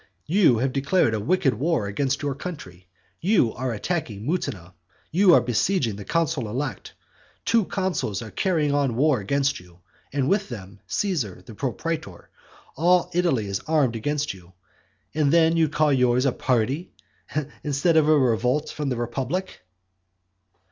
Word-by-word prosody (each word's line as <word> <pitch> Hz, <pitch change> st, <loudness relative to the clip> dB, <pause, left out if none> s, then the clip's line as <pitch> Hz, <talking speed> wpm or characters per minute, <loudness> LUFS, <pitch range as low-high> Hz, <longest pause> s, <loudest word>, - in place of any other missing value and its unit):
You 165 Hz, -, +4 dB
have 130 Hz, +3 st, 0 dB
declared 140 Hz, -2 st, +2 dB
a 110 Hz, -, 0 dB
wicked 150 Hz, -, +2 dB
war 140 Hz, 0 st, 0 dB
against 135 Hz, +8 st, -1 dB
your 145 Hz, -1 st, 0 dB
country; 95 Hz, -, -8 dB, 0.3 s
you 180 Hz, -, +2 dB
are 130 Hz, 0 st, -3 dB
attacking 110 Hz, -, -3 dB
Mutina; 100 Hz, -, -3 dB, 0.4 s
you 180 Hz, +1 st, +6 dB
are -, -, +5 dB
besieging 120 Hz, -, 0 dB
the 100 Hz, -, -8 dB
consul 160 Hz, -, 0 dB
elect; 125 Hz, -2 st, -4 dB, 0.5 s
two 230 Hz, -3 st, +3 dB
consuls 185 Hz, -, -2 dB
are 110 Hz, -, -9 dB
carrying 160 Hz, -6 st, +1 dB
on 140 Hz, -5 st, +1 dB
war 145 Hz, +1 st, +3 dB
against 135 Hz, +7 st, 0 dB
you; 90 Hz, -1 st, -18 dB, 0.3 s
and 135 Hz, -2 st, 0 dB
with 200 Hz, +4 st, +1 dB
them, 100 Hz, -4 st, -9 dB
Caesar, 160 Hz, -, -2 dB
the 115 Hz, -, -10 dB
propraetor; 135 Hz, -, -4 dB, 0.5 s
all 175 Hz, +3 st, +3 dB
Italy 170 Hz, -11 st, +1 dB
is 100 Hz, -1 st, -3 dB
armed 145 Hz, -7 st, +2 dB
against 145 Hz, +5 st, -1 dB
you; 90 Hz, -1 st, -16 dB, 0.6 s
and 150 Hz, -2 st, +2 dB
then 165 Hz, 0 st, +5 dB
do 165 Hz, -, +1 dB
you 160 Hz, -2 st, +3 dB
call 150 Hz, 0 st, +2 dB
yours 125 Hz, 0 st, +3 dB
"a 135 Hz, -, +3 dB
party," 130 Hz, +8 st, -1 dB, 0.7 s
instead 150 Hz, +3 st, +1 dB
of 155 Hz, -1 st, +4 dB
a 155 Hz, -, +6 dB
revolt 125 Hz, +3 st, +1 dB
from 150 Hz, -2 st, -3 dB
the 125 Hz, -, -2 dB
republic? 130 Hz, -, -3 dB
140 Hz, 155 wpm, -24 LUFS, 115-165 Hz, 0.7 s, you